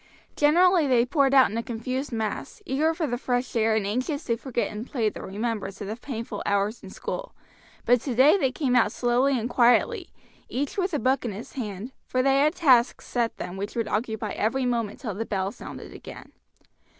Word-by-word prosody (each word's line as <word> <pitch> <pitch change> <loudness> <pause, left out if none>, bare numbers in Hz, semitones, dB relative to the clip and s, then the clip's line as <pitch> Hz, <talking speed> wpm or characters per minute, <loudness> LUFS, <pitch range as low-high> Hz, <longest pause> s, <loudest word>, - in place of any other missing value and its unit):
Generally 340 +2 +4
they 245 -2 +4
poured 275 0 +2
out 265 -5 +6
in 220 - -3
a - - 0
confused 255 +4 -4
mass, 220 - -3
eager 305 +3 +1
for 325 - -1
the 245 -4 -2
fresh 245 -1 -1
air 220 -1 +3
and 215 -2 0
anxious 255 - -2
to 230 - 0
forget 240 0 -2
in 210 +1 -5
play 235 -4 -1
the - - -9
remembrance 205 -1 -4
of 205 - -5
the 215 - -3
painful 230 -1 -6
hours 200 +3 0
in 190 - -10
school; - - -6 0.5
but 245 -1 +4
today 265 - +4
they 270 -10 +1
came 255 -1 0
out 230 -4 +4
slowly 250 +3 +2
and 225 - -2
quietly, 245 - +3 0.4
each 275 +2 -2
with 370 -4 0
a - - +2
book 265 0 +1
in 230 -4 -3
his 210 +4 -9
hand, 215 -1 -5 0.2
for 255 0 +1
they 275 0 +4
had 305 +4 +3
tasks 255 -8 +3
set 235 -2 -1
them 180 +2 -6
which 200 +1 -5
would 230 -2 -1
occupy 220 -1 -2
every 250 +7 0
moment 235 -4 -1
till 225 -7 -4
the 210 +4 -3
bell 195 -3 -2
sounded 240 - -9
again. - - -11
245 Hz, 205 wpm, -26 LUFS, 220-270 Hz, 0.5 s, out